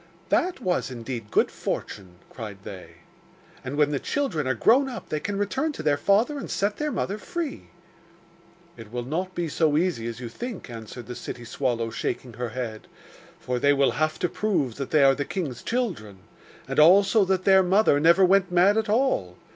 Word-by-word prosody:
'That 365 -4 +1
was 180 - -1
indeed 120 -3 -6
good - - +2
fortune!' 95 -3 -5 0.2
cried 105 -5 -7
they. 95 -3 -10 0.7
'And 130 +1 -5
when 150 -1 +3
the 140 - -1
children 185 - -2
are 130 - +1
grown 260 - +4
up 245 - -8
they 155 - -1
can 200 +5 -3
return 265 +10 -1
to - - -7
their 150 -2 +3
father 210 - +2
and - - -7
set 205 +1 -1
their 300 0 -2
mother 205 -4 -2
free.' 330 +3 -5 1.1
'It 110 -2 -11
will 120 0 -3
not 180 +7 -3
be 175 -1 -1
so 155 -1 +1
easy 160 -9 0
as 115 0 -6
you 125 - -6
think,' 200 - -7
answered 115 +1 -8
the 125 - -7
city 120 0 -7
swallow, 115 -2 -2
shaking 125 +1 -4
her 120 +1 -4
head; 115 -2 -6 0.5
'for 125 -1 -2
they 145 +3 +4
will 140 -1 +3
have 155 0 -1
to - - 0
prove 170 - -1
that 135 -2 -4
they 150 -3 +4
are 135 0 +6
the 145 - -2
king's 140 - -4
children, 185 - -3 0.5
and - - -1
also 195 +6 +6
that 190 -1 0
their 190 -1 +6
mother 190 -4 +3
never 170 +5 +5
went 195 0 +3
mad 185 +4 +4
at 220 -1 -3
all. 210 - +1
155 Hz, 195 wpm, -25 LUFS, 125-200 Hz, 1.1 s, are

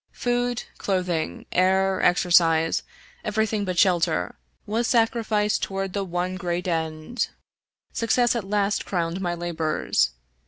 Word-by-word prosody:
Food, 245 0 -1 0.2
clothing, 180 - -1
air, 190 +1 +2
exercise, 165 -2 +4 0.4
every 220 0 +1
thing 210 -1 -2
but 185 -2 -3
shelter, 170 - +2 0.3
was 230 +3 0
sacrificed 225 -3 +1
toward 195 -1 -3
the 200 - -1
one 180 +1 -3
gpreat 175 -1 -2
end. 160 +6 -2 0.7
Success 240 +1 +2
at 235 - -1
last 205 0 +1
crowned 175 0 -2
my 175 -2 -1
labors. 165 - 0
190 Hz, 120 wpm, -24 LUFS, 175-210 Hz, 0.7 s, exercise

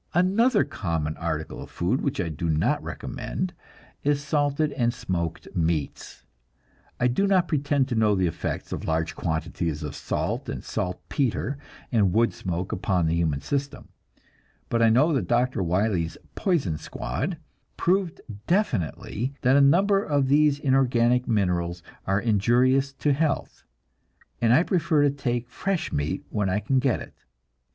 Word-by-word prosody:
Another 205 +6 +4
common 80 -4 -3
article 80 -2 -3
of - - -9
food 95 +10 -1
which 140 - -2
I 90 - 0
do 80 +2 -3
not 80 0 +1
recommend 180 0 -4 0.5
is 145 0 +1
salted 145 +1 +1
and 120 -5 +1
smoked 90 -9 -3
meats. 80 -3 -2 0.8
I 125 - +3
do 195 +12 +1
not 185 -3 +3
pretend 145 -3 +1
to - - -1
know 110 -2 +3
the 95 -1 +1
effects 85 - -3
of - - -4
large 80 0 -1
quantities 80 -1 -2
of 75 -2 -5
salt - - -2
and - - -5
saltpetre 120 - -2 0.4
and 100 -7 +3
wood 115 +2 +3
smoke 90 0 -4
upon 90 -3 0
the 80 - +1
human 80 -4 0
system, 140 0 -3 0.8
but 115 - +1
I 115 - +6
know 140 +9 +4
that 135 - 0
Dr. 120 -2 +1
Wiley's 90 -1 0 0.2
"poison 140 - 0
squad" 165 - -4 0.4
proved 185 -1 +1 0.3
definitely 130 - -1
that 130 +1 +4
a 140 - +6
number 195 +8 +4
of 140 -3 +1
these 145 0 +4
inorganic 125 -3 +2
minerals 90 -5 0 0.2
are 95 +1 +2
injurious 120 +6 +3
to 145 +1 +1
health, 150 0 -1 0.8
and 115 - +4
I 155 +8 +6
prefer 170 -5 +2
to 145 - +4
take 120 -4 -2
fresh 195 -3 -2
meat 75 +6 -2
when 105 -3 0
I 95 - +1
can 130 +6 +1
get 130 -2 +1
it. - - -10
120 Hz, 150 wpm, -25 LUFS, 90-145 Hz, 0.8 s, I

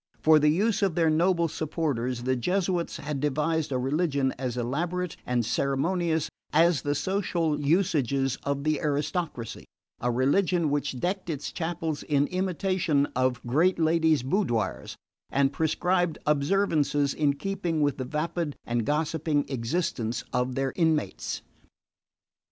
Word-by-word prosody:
For 155 0 +6
the 150 0 +4
use 200 +8 +1
of 190 -5 +1
their 165 -2 +3
noble 170 +1 +2
supporters, 140 -7 -2
the 130 +1 +1
Jesuits 180 +5 -1
had 145 -1 -4
devised 150 +2 0
a 130 - +1
religion 140 0 +1
as 125 -2 -4
elaborate 170 +9 -2
and 120 -2 +1
ceremonious 160 - 0 0.2
as 165 -2 +4
the 145 0 -1
social 170 -4 0
usages 140 -5 +1
of 140 0 -2
the 155 -1 +1
aristocracy: 145 - -2 0.3
a 125 - 0
religion 155 +6 +2
which 140 -3 -1
decked 185 +2 -2
its 150 -3 -3
chapels 160 -2 -3
in 145 -2 +1
imitation 185 -4 +1
of 130 -1 0
great 160 +10 +3
ladies' 160 -3 +3
boudoirs 130 - -1 0.3
and 140 0 +2
prescribed 175 +2 +1
observances 150 -2 +2
in 145 -2 +2
keeping 170 0 -2
with 145 -2 +1
the 130 - -3
vapid 155 +2 -2
and 120 -1 -1
gossiping 150 0 0
existence 120 -2 -2
of 125 0 0
their 135 0 -1
inmates. 160 -3 0
150 Hz, 135 wpm, -27 LUFS, 135-170 Hz, 0.3 s, For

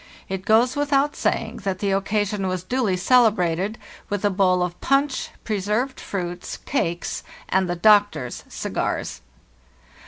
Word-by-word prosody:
It 190 0 -4
goes 235 +4 +4
without 290 0 +1
saying - - -1
that 195 -2 -2
the 200 0 -1
occasion 200 0 0
was 185 -1 -2
duly 215 -2 0
celebrated 200 -3 +3 0.3
with 205 0 -1
a 205 - +3
bowl 185 -2 +3
of 175 0 -4
punch, 275 0 +1
preserved 215 +5 -1
fruits, 175 -2 -5
cakes, 175 -11 -2 0.3
and 190 -1 +2
the 175 - 0
doctor's 200 - +3
cigars. - - -3
200 Hz, 130 wpm, -23 LUFS, 185-230 Hz, 0.3 s, goes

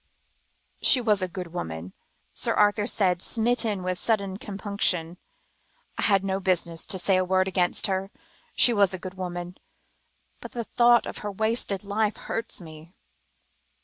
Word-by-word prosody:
"She 260 - +7
was 215 -5 +2
a 185 - -1
good 180 -2 -8
woman," 80 - -6 0.4
Sir - - 0
Arthur 205 0 +2
said, 180 -6 +1
smitten 225 -4 0
with 185 0 -2
sudden 200 -4 0
compunction. 195 -5 -2 0.8
"I - - -4
had 195 -2 +3
no 195 0 -1
business 170 -3 -1
to 190 - 0
say 185 +1 +2
a 185 - +2
word 185 +1 +1
against 180 -1 +1
her; 190 0 -2 0.5
she 240 - +7
was 200 -3 +3
a - - -8
good 185 +1 -7
woman, 180 -1 -6 0.8
but - - -10
the 235 - -3
thought 240 +1 +4
of - - -6
her 210 - -5
wasted 220 -1 -1
life 210 +1 -1
hurts 230 0 -4
me." 160 +1 -13
190 Hz, 155 wpm, -25 LUFS, 180-210 Hz, 0.8 s, She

